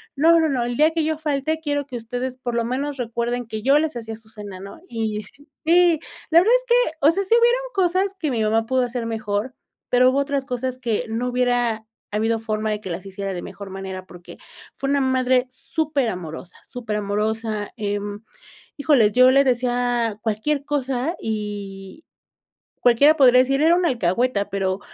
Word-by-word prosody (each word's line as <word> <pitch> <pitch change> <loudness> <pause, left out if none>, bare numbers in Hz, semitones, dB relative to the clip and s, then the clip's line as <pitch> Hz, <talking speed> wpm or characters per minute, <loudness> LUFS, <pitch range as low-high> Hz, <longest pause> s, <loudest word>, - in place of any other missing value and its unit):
"no, 330 +4 +5
no, 320 -1 +2
no, 255 -3 0
el 240 0 -3
día 305 +1 +5
que 325 -1 0
yo 315 0 -1
falte, 310 +1 -1
quiero 290 -2 -1
que 250 -3 -5
ustedes, 245 +3 -5
por 240 -2 -4
lo 235 - 0
menos, 275 +4 -3
recuerden 235 0 -2
que 220 -1 -5
yo 275 +5 +4
les 310 -4 -2
hacía 225 -1 -6
su 220 0 -16
cena", 205 -4 -9
¿no? 200 - -10
Y, 220 -2 -3 0.4
si, 340 -1 +5 0.3
la 330 - +8
verdad 420 +7 +4
es - - 0
que, - - +3
o 295 +3 +6
sea, 395 +3 -1
sí 450 +5 +3
hubieron 480 +1 +3
cosas 380 +1 +1
que 305 -4 -1
mi 230 - -1
mamá 225 +1 +1
pudo 260 +2 +1
hacer 240 -1 -3
mejor, 220 +1 -3 0.4
pero 250 +1 +5
hubo 265 - 0
otras 280 -1 -1
cosas 255 0 -3
que 235 -1 -1
no 230 +3 -2
hubiera 245 -3 0 0.3
habido 225 +2 0
forma 215 -1 -2
de 210 0 -3
que 190 - -7
las 175 +3 -5
hiciera 195 0 -5
de 175 - -5
mejor 200 -1 -9
manera, 190 -1 -7
porque 175 -1 -13 0.4
fue 275 - -3
una 280 0 +2
madre 260 -1 +2
súper 285 -1 -1
amorosa, 175 -1 -7
súper 230 -5 -5
amorosa, 210 +1 -2
eh, 205 -2 -2 0.8
híjoles, 280 -8 +3
yo 255 +1 +6
le 275 +1 +5
decía 245 -3 0
cualquier 235 +7 -1
cosa 275 +2 -1
y 205 +2 -6 0.8
cualquiera 280 +6 +5
podría 255 -4 +6
decir, 275 +2 +2
era 330 +2 +5
un 360 - +1
alcahueta, 220 - 0
pero 195 0 -1
245 Hz, 190 wpm, -22 LUFS, 215-280 Hz, 0.8 s, la